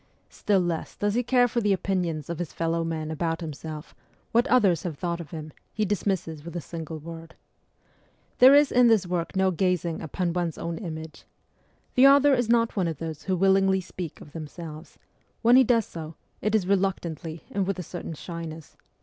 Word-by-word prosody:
Still 200 Hz, -3 st, +1 dB
less 170 Hz, -2 st, -3 dB
does 205 Hz, 0 st, 0 dB
he 240 Hz, -, +2 dB
care 245 Hz, 0 st, +3 dB
for 235 Hz, 0 st, -1 dB
the 205 Hz, -2 st, +3 dB
opinions 175 Hz, -5 st, -1 dB
of 170 Hz, -2 st, -5 dB
his 175 Hz, -, -4 dB
fellow 165 Hz, 0 st, -1 dB
men 160 Hz, -1 st, -3 dB
about 165 Hz, +1 st, -1 dB
himself; 155 Hz, 0 st, -7 dB, 0.4 s
what 235 Hz, +4 st, +3 dB
others 200 Hz, -, +4 dB
have 165 Hz, -5 st, -5 dB
thought 170 Hz, +1 st, -2 dB
of 160 Hz, -, -10 dB
him, 155 Hz, -1 st, -8 dB, 0.2 s
he 215 Hz, -, -1 dB
dismisses 185 Hz, -5 st, -2 dB
with 170 Hz, +1 st, -9 dB
a -, -, -1 dB
single 165 Hz, -1 st, -7 dB
word. 165 Hz, +1 st, -10 dB, 1.0 s
There 260 Hz, +3 st, +9 dB
is 290 Hz, 0 st, +5 dB
in 245 Hz, 0 st, +5 dB
this 220 Hz, -5 st, +4 dB
work 175 Hz, 0 st, -3 dB
no 190 Hz, 0 st, +3 dB
gazing 180 Hz, -2 st, 0 dB
upon 170 Hz, +2 st, -2 dB
one's 175 Hz, -3 st, -2 dB
own 170 Hz, 0 st, -4 dB
image. 160 Hz, -4 st, -7 dB, 0.7 s
The 260 Hz, +2 st, +7 dB
author 280 Hz, +1 st, +6 dB
is 245 Hz, -3 st, +1 dB
not 230 Hz, -1 st, +3 dB
one 190 Hz, -4 st, +1 dB
of 160 Hz, -3 st, -3 dB
those 160 Hz, -1 st, -6 dB
who 185 Hz, -1 st, 0 dB
willingly 195 Hz, +1 st, +4 dB
speak 180 Hz, -3 st, -7 dB
of 150 Hz, -, -12 dB
themselves; 155 Hz, 0 st, -9 dB, 0.5 s
when 235 Hz, +2 st, +6 dB
he 260 Hz, -, +8 dB
does 230 Hz, -3 st, +3 dB
so, 160 Hz, -1 st, -8 dB, 0.3 s
it 215 Hz, +1 st, +1 dB
is 205 Hz, -4 st, +2 dB
reluctantly 175 Hz, -4 st, -1 dB
and 195 Hz, -2 st, -1 dB
with 195 Hz, -, -1 dB
a 180 Hz, -, -4 dB
certain 170 Hz, -1 st, -7 dB
shyness. 165 Hz, -1 st, -8 dB
175 Hz, 190 wpm, -26 LUFS, 165-200 Hz, 1.0 s, There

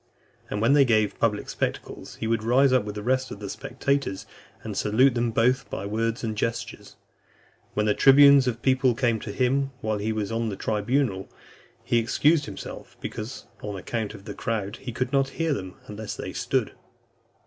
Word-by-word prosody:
And 105 Hz, -, -2 dB
when 125 Hz, +5 st, +5 dB
they 145 Hz, -1 st, +7 dB
gave 110 Hz, -5 st, +1 dB
public 105 Hz, -3 st, 0 dB
spectacles, -, -, -4 dB
he -, -, -5 dB
would 115 Hz, 0 st, +1 dB
rise 130 Hz, +3 st, +4 dB
up 130 Hz, -, +4 dB
with 105 Hz, 0 st, -5 dB
the 105 Hz, -, -5 dB
rest 130 Hz, +2 st, +1 dB
of 100 Hz, -, -8 dB
the 100 Hz, -2 st, -5 dB
spectators, 135 Hz, -6 st, -2 dB, 0.4 s
and -, -, -5 dB
salute 125 Hz, +6 st, +3 dB
them 120 Hz, 0 st, 0 dB
both 120 Hz, +3 st, +1 dB
by 95 Hz, -, -4 dB
words 115 Hz, +3 st, -1 dB
and 110 Hz, -2 st, -2 dB
gestures. 115 Hz, +2 st, -4 dB, 0.8 s
When 105 Hz, -, +1 dB
the 105 Hz, -, +3 dB
tribunes 140 Hz, +1 st, +7 dB
of 125 Hz, -, +1 dB
the 120 Hz, -, -26 dB
people 130 Hz, -1 st, +3 dB
came 120 Hz, -3 st, +1 dB
to 105 Hz, -, -6 dB
him 135 Hz, +4 st, +1 dB
while 110 Hz, -1 st, -1 dB
he 110 Hz, +2 st, -1 dB
was 110 Hz, -1 st, -2 dB
on 115 Hz, 0 st, -1 dB
the 100 Hz, -, -4 dB
tribunal, 105 Hz, 0 st, -1 dB, 0.5 s
he 120 Hz, -, +2 dB
excused 145 Hz, +7 st, +2 dB
himself, 100 Hz, -4 st, -9 dB
because, 110 Hz, +5 st, -6 dB, 0.2 s
on 105 Hz, -1 st, -5 dB
account 110 Hz, +2 st, -4 dB
of 100 Hz, -1 st, -13 dB
the 105 Hz, -, -6 dB
crowd, 105 Hz, -3 st, -3 dB
he 125 Hz, -, -7 dB
could 125 Hz, +2 st, -3 dB
not 135 Hz, -1 st, +2 dB
hear 165 Hz, -2 st, +1 dB
them 95 Hz, -7 st, -5 dB
unless 105 Hz, 0 st, -6 dB
they -, -, -6 dB
stood. -, -, -1 dB
115 Hz, 190 wpm, -25 LUFS, 105-130 Hz, 0.8 s, they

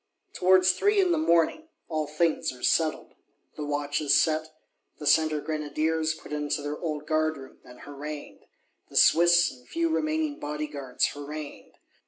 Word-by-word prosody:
Towards 185 Hz, 0 st, +4 dB
three 410 Hz, -, +2 dB
in 370 Hz, -2 st, +3 dB
the 335 Hz, -, +2 dB
morning 310 Hz, -, +2 dB, 0.2 s
all 155 Hz, -2 st, -2 dB
things 155 Hz, +2 st, 0 dB
are 125 Hz, -1 st, -13 dB
settled: 160 Hz, -2 st, +1 dB, 0.4 s
the 150 Hz, -, -5 dB
watches 145 Hz, 0 st, +1 dB
set, 155 Hz, -1 st, +1 dB, 0.5 s
the 150 Hz, -, -8 dB
Centre 155 Hz, +1 st, +3 dB
Grenadiers 155 Hz, +1 st, -1 dB
put 150 Hz, -, -11 dB
into 150 Hz, 0 st, -2 dB
their 145 Hz, +1 st, -4 dB
old 155 Hz, -3 st, -4 dB
Guard 155 Hz, 0 st, 0 dB
room, 135 Hz, -1 st, -13 dB
and 125 Hz, 0 st, -15 dB
harangued; 145 Hz, +1 st, -8 dB, 0.4 s
the -, -, -15 dB
Swiss, 175 Hz, +1 st, +5 dB
and 125 Hz, -1 st, -17 dB
few 335 Hz, 0 st, 0 dB
remaining 310 Hz, -1 st, -1 dB
Bodyguards 145 Hz, -3 st, -2 dB
harangued. 145 Hz, +1 st, -8 dB
155 Hz, 150 wpm, -27 LUFS, 145-170 Hz, 0.5 s, Swiss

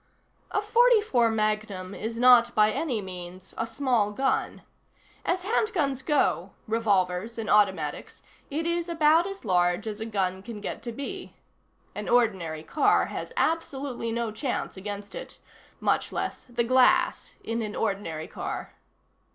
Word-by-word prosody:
A 410 Hz, -, 0 dB
.44 430 Hz, -, +4 dB
Magnum 215 Hz, -3 st, -1 dB
is 225 Hz, +3 st, -5 dB
not, 240 Hz, -1 st, +6 dB
by 215 Hz, 0 st, +5 dB
any 235 Hz, -4 st, -1 dB
means, 180 Hz, 0 st, -9 dB
a 225 Hz, -, -2 dB
small 235 Hz, -3 st, +1 dB
gun. 265 Hz, +5 st, -1 dB, 0.6 s
As 360 Hz, +1 st, 0 dB
handguns 350 Hz, -, 0 dB
go 295 Hz, +2 st, +1 dB
revolvers 210 Hz, -1 st, 0 dB
and 225 Hz, -2 st, -4 dB
automatics 190 Hz, -8 st, +1 dB, 0.3 s
it 315 Hz, +3 st, -2 dB
is 340 Hz, 0 st, -1 dB
about 325 Hz, +1 st, +4 dB
as 390 Hz, -8 st, -8 dB
large 180 Hz, 0 st, +2 dB
as 215 Hz, -1 st, -5 dB
a 220 Hz, -, -3 dB
gun 190 Hz, -3 st, -1 dB
can 215 Hz, +1 st, -8 dB
get 205 Hz, -, -5 dB
to 235 Hz, +1 st, -5 dB
be. 285 Hz, +10 st, -6 dB, 0.6 s
An 210 Hz, 0 st, -5 dB
ordinary 185 Hz, -10 st, +1 dB
car 285 Hz, -, +3 dB
has -, -, -5 dB
absolutely 275 Hz, -7 st, -1 dB
no 230 Hz, -1 st, -1 dB
chance 245 Hz, +4 st, -3 dB
against 205 Hz, +1 st, -6 dB
it. -, -, -8 dB, 0.4 s
Much -, -, +1 dB
less -, -, -4 dB
the 240 Hz, 0 st, 0 dB
glass 300 Hz, +9 st, +3 dB
in 230 Hz, +1 st, -2 dB
an 210 Hz, -2 st, -4 dB
ordinary 195 Hz, -7 st, -2 dB
car. -, -, -5 dB
230 Hz, 145 wpm, -27 LUFS, 205-285 Hz, 0.6 s, not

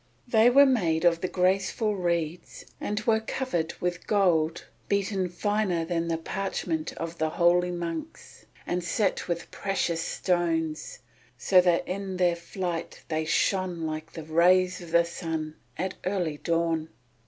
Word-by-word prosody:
They 230 Hz, 0 st, +5 dB
were 280 Hz, +3 st, +7 dB
made 180 Hz, -11 st, +2 dB
of 170 Hz, -1 st, +4 dB
the 185 Hz, -, 0 dB
graceful 195 Hz, +4 st, +1 dB
reeds 170 Hz, -2 st, -2 dB, 0.2 s
and 205 Hz, 0 st, -1 dB
were 220 Hz, 0 st, +3 dB
covered 220 Hz, -7 st, -2 dB
with 175 Hz, -1 st, -3 dB
gold 170 Hz, -6 st, +2 dB, 0.2 s
beaten 195 Hz, -2 st, 0 dB
finer 190 Hz, -2 st, 0 dB
than 170 Hz, 0 st, -1 dB
the 165 Hz, -1 st, 0 dB
parchment 165 Hz, -2 st, -3 dB
of 165 Hz, 0 st, -6 dB
the 160 Hz, 0 st, +1 dB
holy 175 Hz, +2 st, +3 dB
monks, 175 Hz, -, -6 dB, 0.2 s
and 180 Hz, 0 st, -1 dB
set 190 Hz, +3 st, 0 dB
with 170 Hz, -1 st, -3 dB
precious 180 Hz, -4 st, -1 dB
stones 165 Hz, -5 st, -1 dB, 0.4 s
so 185 Hz, +8 st, +5 dB
that 175 Hz, -1 st, +2 dB
in 190 Hz, 0 st, -4 dB
their 175 Hz, -1 st, +3 dB
flight 170 Hz, 0 st, -5 dB
they 155 Hz, -1 st, -1 dB
shone 185 Hz, +1 st, +1 dB
like 155 Hz, 0 st, -5 dB
the 160 Hz, -, -7 dB
rays 180 Hz, +4 st, +3 dB
of 170 Hz, -, -9 dB
the 170 Hz, +1 st, +4 dB
sun 160 Hz, -2 st, -4 dB, 0.2 s
at 185 Hz, +3 st, -2 dB
early 180 Hz, -6 st, -1 dB
dawn. 165 Hz, -1 st, 0 dB
175 Hz, 145 wpm, -27 LUFS, 165-190 Hz, 0.4 s, were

